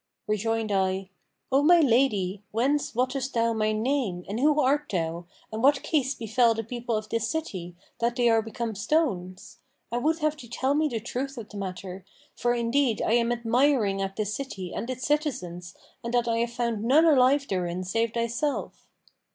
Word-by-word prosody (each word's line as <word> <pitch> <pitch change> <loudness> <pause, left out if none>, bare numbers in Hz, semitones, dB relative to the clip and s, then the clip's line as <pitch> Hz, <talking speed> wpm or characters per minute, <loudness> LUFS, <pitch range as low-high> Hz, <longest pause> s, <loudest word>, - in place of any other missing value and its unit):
Rejoined 220 +1 -1
I, 190 0 0 0.4
'O 270 +2 +4
my 345 +4 +6
lady, 225 - +2
whence 265 +5 0
wottest 260 +2 -1
thou 230 0 +2
my 215 -1 +1
name 215 -5 -1
and 210 +4 -3
who 300 +2 +3
art 290 +2 +2
thou 170 -1 -2 0.3
and 220 - -3
what 275 +1 +4
case 275 -4 0
befel 230 +1 +2
the 225 - -3
people 235 0 -3
of 215 0 -5
this 230 0 -1
city, 190 - -4 0.2
that 235 +1 0
they 245 -2 +2
are 225 -1 +4
become 225 +1 -4
stones? 195 - -1 0.3
I 240 - 0
would 315 +5 +1
have 305 -1 0
thee 245 - -11
tell 265 +2 0
me 305 +1 +2
the 235 -6 -3
truth 260 +4 -4
of 225 -3 -7
the 210 - -9
matter, 185 -1 -6 0.3
for 240 0 +1
indeed 235 0 +1
I - - +1
am 235 0 +3
admiring 240 -3 +2
at 195 0 -3
this 210 -1 -2
city 195 -10 -5
and 235 - -4
its 255 0 -4
citizens 180 - -2 0.3
and 235 - -3
that 240 -1 +2
I 230 0 +1
have 235 0 0
found 235 -3 -2
none 285 +8 +5
alive 280 -2 +4
therein 180 -1 -2
save 225 +5 -1
thyself. 235 +5 -2
235 Hz, 185 wpm, -26 LUFS, 205-270 Hz, 0.4 s, my